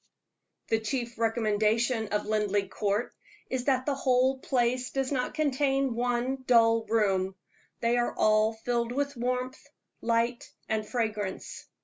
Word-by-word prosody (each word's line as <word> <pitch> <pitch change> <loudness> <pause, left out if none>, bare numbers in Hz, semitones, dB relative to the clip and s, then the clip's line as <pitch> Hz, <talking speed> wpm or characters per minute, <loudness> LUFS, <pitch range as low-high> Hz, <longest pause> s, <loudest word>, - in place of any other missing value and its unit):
The 225 - +2
chief 235 +1 -3
recommendation 225 +1 +1
of 210 0 -1
Linleigh 205 -2 0
Court 205 +4 -1 0.4
is 255 -1 -2
that 260 -2 +2
the 290 - +1
whole 260 0 +2
place 250 0 0
does 270 0 -2
not 255 -3 -1
contain 275 -3 +1
one 245 +2 -1
dull 230 -2 +4
room; 195 -4 +1 0.5
they 235 +1 +2
are 240 - -1
all 215 +1 +3
filled 235 +1 -2
with 280 +2 -1
warmth, 250 +1 -2 0.4
light, 235 +1 0 0.2
and 220 0 0
fragrance. 215 -5 -3
235 Hz, 130 wpm, -28 LUFS, 220-255 Hz, 0.5 s, dull